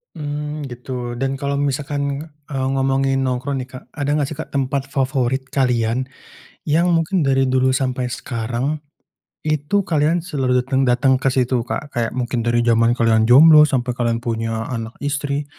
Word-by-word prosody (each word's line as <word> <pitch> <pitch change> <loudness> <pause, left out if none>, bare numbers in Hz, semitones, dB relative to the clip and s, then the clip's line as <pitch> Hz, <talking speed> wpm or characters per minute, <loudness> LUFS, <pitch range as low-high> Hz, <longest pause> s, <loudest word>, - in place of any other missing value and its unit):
Mmm, 150 -1 -4
gitu. 125 -1 -6
Dan 135 +2 -2
kalau 140 0 -1
misalkan 140 +1 -2 0.2
eee, 135 -2 -1
ngomongin 135 0 +1
nongkrong 130 +2 -2
nih 125 - -13
Kak. 130 - -9
Ada 145 -1 -2
enggak 150 -2 +1
sih 155 - -6
Kak, 160 - -7
tempat 135 0 0
favorit 130 -1 0
kalian, 125 -2 +1 0.7
yang 170 +3 +3
mungkin 165 0 +1
dari 135 -1 +2
dulu 130 0 +2
sampai 130 -1 -1
sekarang, 125 +5 -3 0.7
itu 155 +6 0
kalian 155 +2 +2
selalu 130 -6 0
dateng 135 0 +1
dateng 130 +2 +3
ke 135 - +2
situ 125 -1 +1
Kak, 140 +5 -5
kayak 115 -1 -1
mungkin 125 -1 -1
dari 120 0 +1
jaman 115 +1 +3
kalian 110 -1 +3
jomblo 150 +4 +8
sampai 125 -2 0
kalian 115 -1 -1
punya 115 -1 -2
anak, 115 -1 -5
istri, 145 0 -1
135 Hz, 160 wpm, -20 LUFS, 125-145 Hz, 0.7 s, jomblo